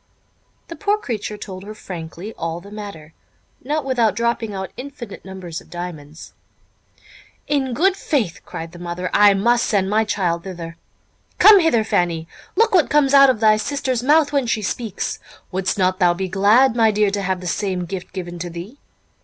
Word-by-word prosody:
The 335 - -8
poor 415 +2 +1
creature 215 - -4
told 190 -2 -8
her 215 +2 -9
frankly 175 +2 -8
all 165 0 -4
the 200 +3 -14
matter, 200 -7 -9 0.5
not 295 +2 -2
without 240 -5 +1
dropping 235 -1 -1
out 190 -1 -5
infinite 250 -5 -9
numbers 185 -4 -7
of - - -20
diamonds. 165 -3 -8 1.1
"In 265 -4 0
good 380 +6 +3
faith," 245 - -1
cried 165 0 -7
the 175 - -12
mother, 175 +1 -4
"I 205 -1 +6
must 235 +4 +2
send 195 -3 +1
my 220 +1 +3
child 175 -5 -1
thither. 170 -3 -7 0.6
Come 425 -2 +8
hither, 320 -10 +3
Fanny, 170 -6 0 0.3
look 450 -1 +3
what 355 -5 +4
comes 290 -2 +3
out 275 -1 +8
of 235 -4 0
thy 215 -1 +5
sister's 260 0 -2
mouth 295 +2 +3
when 275 -4 +1
she 220 -2 0
speaks! 215 0 -3 0.3
Would'st 190 +1 -1
not 185 0 +1
thou 175 -2 +4
be 190 +1 -3
glad, 210 +7 +4
my 225 -2 +4
dear, 210 -1 +2
to 200 0 -2
have 190 -1 -1
the 180 - -9
same 185 0 -2
gift 180 +1 -6
given 175 -2 -6
to 175 0 -4
thee? 175 +11 -9
205 Hz, 180 wpm, -20 LUFS, 180-245 Hz, 1.1 s, Come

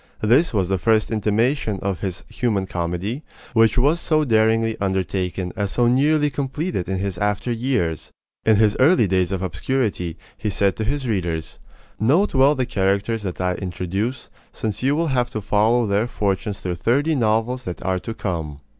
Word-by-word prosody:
This 125 +10 +4
was 95 -5 0
the 95 0 0
first 110 +2 +2
intimation 110 +2 +1
of 95 -3 -2
his 95 -2 -4
"Human 110 -6 -1
Comedy," 90 - -3 0.3
which 115 0 +4
was 145 +7 +3
so 155 -2 +1
daringly 110 -1 +2
undertaken 95 -1 -2
and 100 -2 -1
so 120 +4 +2
nearly 145 +4 +3
completed 140 - -3
in 95 - -1
his 95 -2 -3
after 105 +3 -1
years. 115 - -1 0.3
In 110 - +4
his 105 0 +3
early 130 -3 +5
days 95 -1 +1
of 95 -1 -2
obscurity, 90 -2 -2 0.2
he 105 - -3
said 100 0 +1
to 110 - -2
his 135 +2 -2
readers: 85 -7 -2 0.4
Note 155 - +3
well 135 +2 +5
the 130 -2 0
characters 100 +1 0
that 95 -3 -5
I 90 0 +1
introduce, 95 +6 -4 0.2
since 105 -2 -4
you 135 +3 +2
will 165 +1 0
have 125 -1 +1
to 110 - -4
follow 110 +4 +2
their 105 +3 +1
fortunes 100 -3 -2
through 90 -2 -3
thirty 140 - +1
novels 120 0 0
that 90 - -6
are 95 0 0
to 115 +4 -6
come. 80 -7 -4
110 Hz, 175 wpm, -22 LUFS, 95-125 Hz, 0.4 s, early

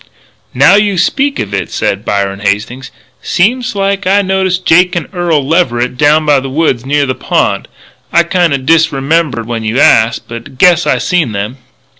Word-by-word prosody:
"Now 140 +8 +5
you 205 -2 0
speak 275 +11 0
of 100 -1 -4
it," 100 - -3
said 100 +1 -2
Byron 100 -2 -2
Hastings, 110 +6 -3 0.3
"seems 245 +5 0
like 195 0 -1
I 200 +2 +3
noticed 190 -1 -1
Jake 180 +2 +3
and 170 -4 -3
Earl 165 -6 -1
Leverett 125 -7 0
down 150 +3 +2
by 145 -2 +3
the 135 0 -6
woods 135 -4 -1
near 145 0 +1
the 130 - -2
pond. - - -1 0.4
I 170 - +3
kinda 170 -4 0
disremembered 145 -2 0
when 115 -1 -4
you 110 +4 -1
asked, 115 +1 +2
but 115 0 -7
I - - -15
guess 175 +3 +3
I - - +2
seen 175 - -1
them." 105 +6 -4
150 Hz, 175 wpm, -11 LUFS, 120-180 Hz, 0.4 s, Now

